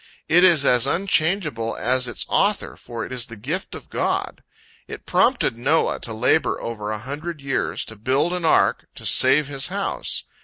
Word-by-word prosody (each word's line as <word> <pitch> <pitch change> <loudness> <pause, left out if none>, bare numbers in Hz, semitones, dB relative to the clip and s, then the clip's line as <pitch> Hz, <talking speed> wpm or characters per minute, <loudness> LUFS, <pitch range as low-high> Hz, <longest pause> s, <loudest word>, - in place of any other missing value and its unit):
It 170 +3 +5
is 165 -6 +5
as 125 +1 +4
unchangeable 155 - 0
as 125 +2 +1
its 120 - -3
Author, 205 0 +1
for 115 -2 -7
it - - -11
is 125 0 -2
the 115 - -10
gift 150 - -5
of - - -12
God. - - -2 0.5
It - - -9
prompted 235 - +1
Noah 145 +7 +1
to 115 - -5
labor 110 0 +1
over 105 -3 -5
a 110 - -2
hundred 145 +8 -6
years, 140 -1 -2
to 110 - -10
build 135 +10 0
an 180 -1 -3
ark, 160 - +2
to - - -9
save 135 +4 +4
his 140 -1 -1
house. - - -2
135 Hz, 180 wpm, -22 LUFS, 115-165 Hz, 0.5 s, It